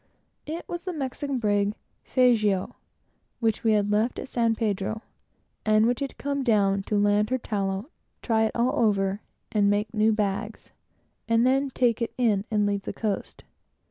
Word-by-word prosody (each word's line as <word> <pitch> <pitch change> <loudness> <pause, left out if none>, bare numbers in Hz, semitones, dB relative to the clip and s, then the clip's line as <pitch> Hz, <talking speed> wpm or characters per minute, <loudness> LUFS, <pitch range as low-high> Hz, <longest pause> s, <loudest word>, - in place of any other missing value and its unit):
It 325 +3 -5
was 345 0 -5
the 365 - -3
Mexican 280 -1 -3
brig 205 -2 +1 0.3
Fazio, 215 -7 +2 0.6
which 225 -2 0
we 225 -1 +4
had 205 -1 +1
left 215 +4 +1
at - - -5
San 230 -3 +1
Pedro, 215 0 -2 0.6
and 215 0 +4
which 245 +1 +1
had 275 -1 -4
come 280 0 -2
down 200 -5 +2
to 210 - +1
land 205 +1 +2
her 260 - +1
tallow, 200 - -3 0.3
try 220 -2 +2
it 220 - -3
all 240 +2 +1
over, 200 -1 +1 0.3
and 205 -2 +3
make 205 +2 0
new 220 0 +3
bags, 210 +1 -3 0.6
and 230 +1 +3
then 270 +2 +2
take 245 -2 +1
it 230 - -2
in, 215 -5 +2
and 210 -2 +1
leave 200 -1 0
the - - -6
coast. 210 -3 -4
220 Hz, 170 wpm, -26 LUFS, 205-245 Hz, 0.6 s, we